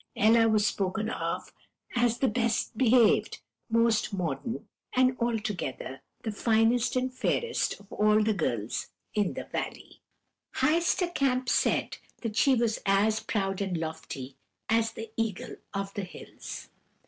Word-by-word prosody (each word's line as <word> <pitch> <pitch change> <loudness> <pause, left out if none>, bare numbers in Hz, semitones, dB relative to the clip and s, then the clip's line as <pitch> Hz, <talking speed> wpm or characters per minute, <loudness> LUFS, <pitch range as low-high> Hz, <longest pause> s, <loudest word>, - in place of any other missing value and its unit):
Ella 225 +1 +5
was 215 -1 +3
spoken 210 +2 -1
of - - -3 0.4
as 240 -1 +2
the 265 - +2
best 230 -1 0
behaved, 235 -1 +4 0.3
most 230 -1 +2
modest, 180 - -3 0.3
and 255 0 +4
altogether 210 - -2 0.2
the 220 - -2
finest 225 +3 +2
and 255 0 0
fairest 465 - 0
of 200 0 -15
all 215 0 +4
the 215 0 +2
girls 120 - -2 0.3
in 205 -3 0
the - - -4
valley. - - -5 0.5
"Heister 345 +2 +2
Kamp 255 -3 +1
said - - +1 0.3
that 220 -2 -3
she 270 +3 +5
was 230 -2 +1
as 205 +2 +3
proud 195 -2 -1
and 190 -3 -1
lofty 160 -5 -6 0.3
as 225 0 +2
the 225 -1 -7
eagle 225 -4 -2
of 195 -1 -3
the 205 - -3
hills. 180 - -9
220 Hz, 135 wpm, -29 LUFS, 195-240 Hz, 0.5 s, Ella